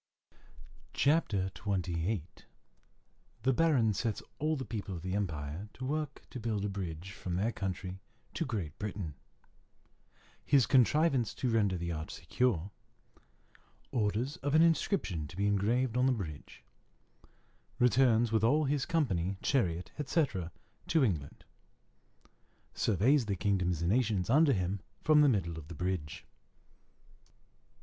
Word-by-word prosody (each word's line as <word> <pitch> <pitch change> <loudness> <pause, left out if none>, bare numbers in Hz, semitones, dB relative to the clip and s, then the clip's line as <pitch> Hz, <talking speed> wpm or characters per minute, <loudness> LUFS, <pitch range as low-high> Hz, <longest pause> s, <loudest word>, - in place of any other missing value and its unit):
CHAPTER 110 - +2
XXVIII 90 -2 -1 1.2
_The 130 0 +3
Baron 130 -10 +3
sets 110 +2 -2 0.2
all 155 +2 +1
the 130 -3 -4
people 105 -3 -5
of 85 - -8
the 95 0 -3
empire 85 -1 -3
to 130 - -6
work 150 +1 -3
to 130 - -6
build 110 -3 -2
a - - -1
bridge 95 -2 -5
from 90 -3 -5
their 105 +6 +1
country 95 -2 -4 0.3
to - - -1
Great 100 - -4
Britain 100 -6 -4 1.3
His 135 -3 +4
contrivance 135 -1 +3
to 125 - -1
render 100 -5 +2
the 85 0 -3
arch 80 -1 -5
secure 95 +2 0 1.2
Orders 120 - -1
an 145 +3 +4
inscription 160 - +1
to 85 - -12
be 100 - +1
engraved 110 +5 +1
on 125 +1 +3
the 130 - +3
bridge 80 -10 -7 1.1
Returns 120 -2 +4
with 110 -1 +2
all 145 +7 +4
his 140 -1 0
company, 100 - 0
chariot, 90 - 0
etc., 135 - 0 0.4
to 160 -3 +3
England 80 - -2 1.3
Surveys 115 +5 +2
the 100 - 0
kingdoms 90 -3 0
and 85 - +2
nations 110 -5 +1
under 145 +1 +5
him 95 0 -1 0.2
from 155 -1 +6
the 145 - +6
middle 85 -8 -1
of 75 - -11
the 85 - -8
bridge. 90 -3 -3
105 Hz, 130 wpm, -32 LUFS, 90-130 Hz, 1.3 s, from